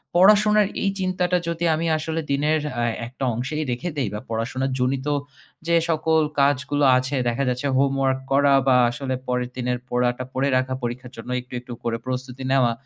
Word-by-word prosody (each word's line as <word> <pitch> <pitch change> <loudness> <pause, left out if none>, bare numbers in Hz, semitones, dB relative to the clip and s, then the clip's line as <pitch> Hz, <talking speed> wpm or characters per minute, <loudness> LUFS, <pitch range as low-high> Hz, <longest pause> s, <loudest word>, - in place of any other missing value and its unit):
পড়াশোনার 210 +2 +5 0.2
এই 200 - +2
চিন্তাটা 185 -1 +1
যদি 170 0 -1
আমি 165 +2 -2
আসলে 160 +1 -3
দিনের 150 +3 +2 0.2
আ - - +1 0.2
একটা 130 +2 -8
অংশেই 135 +7 -2
রেখে 125 +9 -3
দেই, 135 -5 0
বা - - -3
পড়াশোনা 115 +4 -2
জনিত 130 +2 0 0.6
যে 170 - +3
সকল 160 0 +2 0.2
কাজগুলো 140 +1 +2
আছে 130 +2 -2
দেখা 120 +4 -1
যাচ্ছে 125 +3 -1
হোমওয়ার্ক 135 -1 +2
করা 140 +1 +4
বা 130 -1 +6
আসলে 130 +2 -3
পরের 125 -1 -1
দিনের 125 0 -1
পড়াটা 125 +1 0
পড়ে 135 +2 +1
রাখা, 130 0 -1
পরীক্ষার 125 +1 -4
জন্য 115 - -9
একটু, 125 +1 -17
একটু 125 0 -9
করে 115 -1 -1
প্রস্তুতি 130 0 -5
নেওয়া। 130 -3 +4
135 Hz, 175 wpm, -23 LUFS, 125-155 Hz, 0.6 s, বা